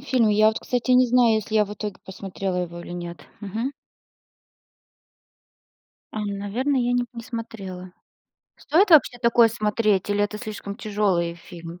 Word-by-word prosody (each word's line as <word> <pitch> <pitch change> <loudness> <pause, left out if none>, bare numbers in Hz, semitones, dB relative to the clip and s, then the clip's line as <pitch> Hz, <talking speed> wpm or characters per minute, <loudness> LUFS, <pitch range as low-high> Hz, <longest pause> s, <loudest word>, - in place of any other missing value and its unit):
фильм, 255 -5 +2
я 215 +1 +5
вот 220 - -1
кстати, 245 -1 -2
не 250 0 +6
знаю, 240 -2 +4
если 220 0 -2
я 215 -1 +5
в 205 - -8
итоге 210 -3 -5
посмотрела 190 -1 -5
его 175 -1 -4
или 175 - -9
нет. 175 -1 -6 0.2
Мгм. 220 +6 -3 2.4
Ам. 215 -1 -3
Наверное 255 +7 0
я 245 0 +1
не 245 0 +1
не 235 - -8
смотрела. 195 -6 -7 0.6
Стоит 360 +7 +2
вообще 285 -6 +6
такое 235 -1 +5
смотреть 210 -3 0
или 205 0 +2
это 205 +1 -2
слишком 210 -2 -7
тяжелые 200 -7 0
фильм? 170 0 -11
215 Hz, 155 wpm, -24 LUFS, 190-235 Hz, 2.4 s, не